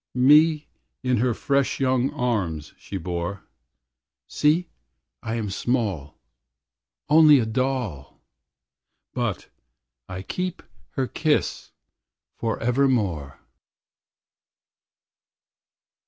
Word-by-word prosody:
Me 150 +4 +5 0.4
in 125 -1 +2
her 125 +3 +2
fresh 140 +3 0
young 130 -1 +2
arms 95 -11 -2
she 100 - -7
bore. 90 +2 -4 0.8
See, 160 +4 +2 0.5
I 110 - -3
am 110 -4 -3
small, 100 - -2 0.9
Only 150 -1 +7
a 120 - +1
doll. 115 - -3 0.9
But 120 -7 -3 0.6
I 95 0 -6
keep 180 - -4 0.3
her 135 - 0
kiss 150 +3 -1 0.7
forevermore. 115 - 0
120 Hz, 80 wpm, -24 LUFS, 100-140 Hz, 0.9 s, Only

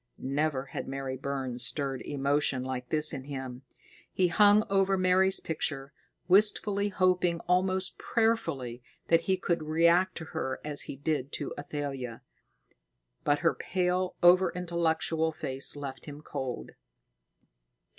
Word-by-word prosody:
Never 140 0 -1
had - - -6
Mary 135 -1 -4
Burns 130 -2 -3
stirred 135 0 -1
emotion 140 -2 0
like 130 -1 -5
this 155 0 +2
in 135 -2 -6
him. 130 -3 -6 0.5
He 180 -1 +2
hung 205 +4 +5
over 195 0 +2
Mary's 185 +1 +3
picture, 145 -3 -4 0.3
wistfully, 205 +1 +4
hoping 180 -3 +1
almost 185 +1 0
prayerfully 165 - -1 0.3
that 165 0 +5
he 190 -1 0
could 170 -2 -1
react 170 +4 +3
to 160 - -6
her 130 -5 -3
as 150 -1 -4
he - - -4
did 140 -1 -2
to 145 - -4
Athalia; 140 -5 -5 1.0
but 145 0 +2
her 165 - +5
pale, 180 0 -1
over 180 +2 +6
intellectual 165 -2 0
face 135 -3 -1
left 140 -1 -7
him 145 0 -8
cold. 130 - -5
155 Hz, 130 wpm, -29 LUFS, 135-180 Hz, 1.0 s, over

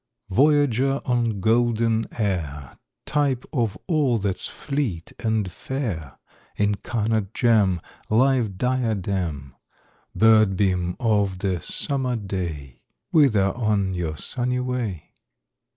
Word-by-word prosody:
Voyager 135 +1 +3
on 120 -5 0
golden 115 0 +2
air, 80 - -3 0.3
Type 140 -4 0
of 115 -7 0
all 150 -9 +2
that's 100 -3 -1
fleet 135 - -3
and 110 -5 0
fair, 95 - -4 0.4
Incarnate 105 0 -1
gem, 105 -7 +3 0.3
Live 115 -3 +2
diadem 95 - -1 0.6
Bird 110 -3 +5
beam 90 -3 0
of 105 -6 +1
the 90 -3 -1
summer 130 - -1
day,— 90 - -5 0.3
Whither 110 -11 +4
on 105 -5 0
your 85 -4 -3
sunny 125 - -2
way? 125 -9 -3
110 Hz, 100 wpm, -24 LUFS, 95-125 Hz, 0.6 s, Bird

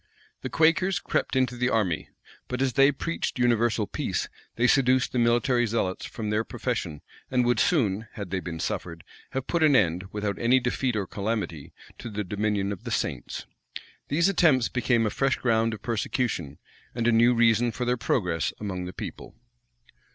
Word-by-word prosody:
The - - -4
Quakers 170 +4 +3
crept 180 - -1
into 130 -2 +1
the 125 +1 0
army; 95 - 0 0.4
but 125 - -3
as 130 -2 +1
they 135 +3 +5
preached 165 +2 -3
universal 120 -3 +2
peace, - - -3 0.3
they 120 - +1
seduced 130 0 +3
the 125 - 0
military 120 +1 +2
zealots 100 -4 -2
from 105 -2 -4
their 105 +1 +1
profession, 115 - -4 0.3
and 125 -1 +2
would 120 -2 +2
soon, 110 - +1
had 100 -6 -7
they 95 - 0
been 85 -2 -6
suffered, 85 -1 -4 0.3
have 135 -1 -2
put 170 - -1
an 150 -3 +5
end, 90 -4 +2
without 105 -1 -3
any 125 +3 +4
defeat 125 0 -1
or 100 -2 -1
calamity, 100 -8 -4 0.3
to 120 - -6
the 105 0 -3
dominion 100 0 -1
of 100 - -6
the - - -5
saints. - - -3 0.6
These 165 +5 +2
attempts 160 -10 +3
became 120 -2 +1
a 105 - 0
fresh 135 -1 +1
ground 115 -2 +1
of 105 - -15
persecution, 110 - -2 0.4
and 120 -1 0
a - - +5
new 120 +2 +5
reason 115 0 +3
for 125 +3 -3
their 125 +1 +2
progress 90 - -1
among 95 -3 -4
the 90 - -7
people. - - -8
115 Hz, 180 wpm, -26 LUFS, 100-125 Hz, 0.6 s, they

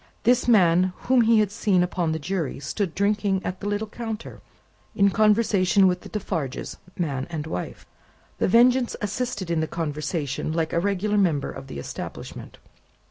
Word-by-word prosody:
This 245 +1 +3
man, 180 -5 +4
whom 255 -1 +3
he 225 -1 +5
had 205 -2 0
seen 205 -4 +2
upon 175 -2 -1
the 160 - -1
Jury, 165 -2 -3
stood 175 +4 -3
drinking 200 -1 +1
at 185 +1 -3
the 205 - -5
little 205 +1 -1
counter, 225 0 -7 0.5
in 200 0 +4
conversation 210 -3 +3
with 180 -1 +2
the - - -11
Defarges, 165 -10 -4 0.2
man 140 -6 -2
and 155 -3 -4
wife. 125 - -5 0.5
The - - +2
Vengeance 245 +4 +4
assisted 210 -3 -3
in 165 - +1
the 160 - 0
conversation, 155 -2 -3
like 165 -1 -1
a 170 - +2
regular 200 +2 0
member 160 -8 +1
of 135 - -9
the - - -7
establishment. 70 - -7
190 Hz, 165 wpm, -24 LUFS, 165-210 Hz, 0.5 s, he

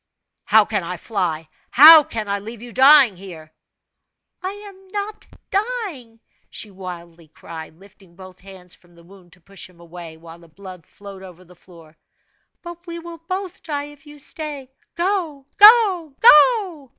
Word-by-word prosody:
"How - - +4
can - - -3
I - - -7
fly? 170 -7 -4 0.2
how 310 +4 +9
can 220 -6 -7
I 200 0 -3
leave 225 +3 -11
you 240 - -11
dying 265 -3 +5
here?" 165 -5 -13 0.9
"I 370 - -4
am 400 -1 -13
not 410 +2 -7 0.2
dying!" 390 - -5 0.3
she 210 - -8
wildly 175 -3 -11
cried, 160 0 -12
lifting 195 -2 -21
both 185 0 -15
hands 185 -2 -14
from 175 -1 -23
the 170 - -20
wound 180 -1 -20
to 180 - -19
push 195 +2 -13
him 175 -2 -24
away, 170 -1 -12
while 165 +1 -15
the 170 - -19
blood 185 0 -14
flowed 200 -1 -14
over 185 -1 -14
the 180 +1 -20
floor. 165 -3 -19 0.7
"But 345 0 -12
we 340 0 -7
will 335 0 -11
both 370 +2 -7
die 290 -2 -6
if 290 +1 -23
you 295 0 -14
stay. 290 -2 -7 0.2
Go 340 -6 -3
go 405 - +5
go!" 365 - +4
225 Hz, 160 wpm, -19 LUFS, -, 0.9 s, how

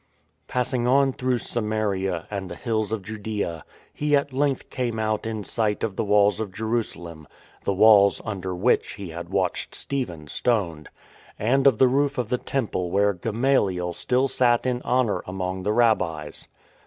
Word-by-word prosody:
Passing 125 -1 0
on 135 +1 +4
through 130 -1 0
Samaria 105 -6 -1
and 95 -2 -4
the 85 - -6
hills 110 -1 -2
of 110 -3 -2
Judaea 105 -5 -4 0.3
he 150 0 +1
at 140 -1 0
length 140 0 -1
came 120 -4 -2
out 110 0 -1
in 110 -2 -4
sight 105 0 -1
of 105 - -2
the - - -1
walls 105 0 +3
of 110 -2 -3
Jerusa 110 +3 -2
lem 85 -3 -10 0.4
(the 100 - +1
walls 100 0 +6
under 95 -3 -4
which 100 +8 +1
he 100 -4 -7
had 85 +1 -7
watched 95 -2 -1
Stephen 90 - -3
stoned), 85 -4 -1 0.5
and 135 +6 +3
of 130 -5 +5
the 130 - +6
roof 140 +2 +1
of 120 -4 -2
the 125 - 0
Temple 105 -9 -2
where 100 +2 +2
Gama 115 +9 +1
liel 90 -3 -2
still 130 +8 +1
sat 120 -2 +2
in 125 -1 0
honour 125 -5 +1
among 95 0 -3
the 105 +3 0
Rabbis. 100 -10 +1
110 Hz, 170 wpm, -24 LUFS, 95-125 Hz, 0.5 s, walls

